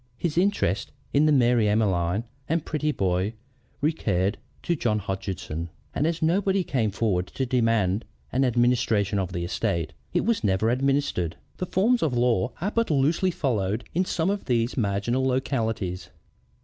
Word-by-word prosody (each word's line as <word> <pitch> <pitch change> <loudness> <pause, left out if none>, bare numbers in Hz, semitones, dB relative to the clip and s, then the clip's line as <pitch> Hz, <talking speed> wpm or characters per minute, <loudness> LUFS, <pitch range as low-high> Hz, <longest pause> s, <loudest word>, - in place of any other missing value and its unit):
His 170 -3 -2
interest 175 - +1 0.2
in 145 +2 +4
the - - +4
Mary 120 -5 +4
Emmeline 100 -2 +1 0.3
and 165 +2 +2
the - - -26
Prettyboat 105 - 0 0.5
recurred 105 - 0 0.2
to 170 - +1
John 115 -7 0
Hodgeson; 95 -4 -4 0.2
and 150 - +1
as 165 -1 -1
nobody 190 +3 +2
came 125 -9 0
forward 95 -3 0
to 130 - -3
demand 115 -5 +1 0.3
an 130 +2 +2
administration 120 -5 +2
of 95 -1 -2
the 85 -1 -3
estate, 85 -5 -1 0.2
it 175 - 0
was 230 -1 +1
never 105 +3 +2
administered. 130 - 0 0.2
The 180 - -3
forms 230 +8 +2
of 145 -6 +1
law 120 0 +2
are 195 +5 -1
but 230 0 +1
loosely 155 +6 +2
followed 115 - -1
in 180 - +2
some 180 0 0
of 200 0 -3
these 120 -1 +1
marginal 115 +3 0
localities." 115 -8 -1
120 Hz, 155 wpm, -26 LUFS, 100-155 Hz, 0.5 s, in